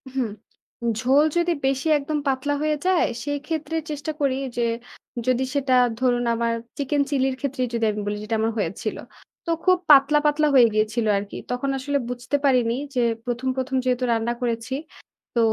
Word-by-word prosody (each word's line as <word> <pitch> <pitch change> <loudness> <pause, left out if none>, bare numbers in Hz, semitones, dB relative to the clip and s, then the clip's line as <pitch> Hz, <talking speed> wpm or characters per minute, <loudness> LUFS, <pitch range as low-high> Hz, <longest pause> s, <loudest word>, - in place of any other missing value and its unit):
হুম, 255 -4 0 0.7
ঝোল 270 +4 +4
যদি 345 0 +2
বেশি 270 +3 0
একদম 295 +1 -2
পাতলা 270 +2 0
হয়ে 305 0 +1
যায়, 370 -2 +3 0.2
সেইক্ষেত্রে 295 +2 -3
চেষ্টা 295 +1 -3
করি 270 -2 +2 0.2
যে 240 - +2 0.6
যদি 255 0 +2
সেটা 270 -2 +1 0.3
ধরুন, 245 -1 +2
আমার 230 0 0 0.2
chicken 285 +1 0
chili 270 -2 +1
র - - -6
ক্ষেত্রেই 260 -3 -1
যদি 230 -1 +1
আমি 210 0 -4
বলি 205 0 -2
যেটা 225 +1 -2
আমার 225 +1 +1
হয়েছিল। - - -3 0.5
তো - - -5 0.2
খুব 370 0 +5
পাতলা, 290 +1 +7
পাতলা 300 +1 +3
হয়ে 245 -3 +8
গিয়েছিল 215 +2 +1
আরকি। 200 0 -5
তখন 250 +3 -1
আসলে 285 +2 -1
বুঝতে 245 +3 -3
পারিনি 245 -3 +3 0.2
যে 245 - +2 0.2
১ম- 245 +1 -2
১ম 265 0 -2
যেহেতু 250 0 +1
রান্না 230 +1 +1
করেছি 235 +1 -2 0.6
তো - - +3
260 Hz, 170 wpm, -23 LUFS, 240-290 Hz, 0.7 s, হয়ে